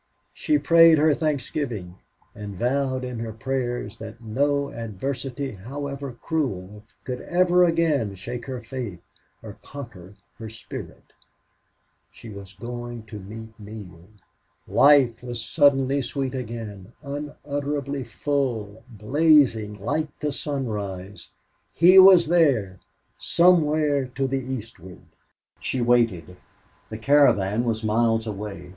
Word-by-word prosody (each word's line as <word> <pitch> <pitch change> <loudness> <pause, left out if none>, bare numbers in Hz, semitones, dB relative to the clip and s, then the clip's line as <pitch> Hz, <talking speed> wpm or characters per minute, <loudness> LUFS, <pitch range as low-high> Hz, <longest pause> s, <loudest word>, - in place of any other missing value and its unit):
She 305 - +1
prayed 165 - +6
her 155 +1 +4
thanksgiving, 130 - -3 0.4
and 105 -2 -8
vowed 130 +4 -1
in 125 -2 -5
her 115 -1 -4
prayers 120 -2 -3
that 110 +1 -9
no 140 +5 0
adversity, 130 +5 -4
however 140 +5 -6
cruel, 105 - -3 0.2
could 125 -1 -5
ever 180 0 +3
again 160 - +1
shake 120 +6 -7
her 130 -2 -4
faith 115 -6 -6 0.4
or - - -10
conquer 110 -9 -10 0.2
her 110 -1 -7
spirit. 115 +1 -10 1.0
She 115 - -12
was 100 -2 -10
going 120 0 -7
on - - -20
to 105 - -7
meet 110 +3 -9
Neale. 100 -5 -11 0.6
Life 140 -5 +5
was 120 -1 -6
suddenly 140 -1 +3
sweet 130 +1 -3
again, 110 -4 -7
unutterably 145 -1 -4
full, 115 -4 -3
blazing 115 -3 +2
like 145 +8 -2
the 150 - -2
sunrise. 105 -10 -5 0.5
He 185 +3 +7
was 185 -2 +8
there 135 - +2 0.4
somewhere 155 -5 +3
to 135 +1 0
the 135 0 -1
eastward. 115 -8 -8 0.6
She 130 - -2
waited. 115 -8 +1 0.5
The 110 - -6
caravan 115 -4 +3
was 115 -1 -1
miles 115 +1 +1
away. 100 -4 -6
120 Hz, 115 wpm, -24 LUFS, 110-145 Hz, 1.0 s, was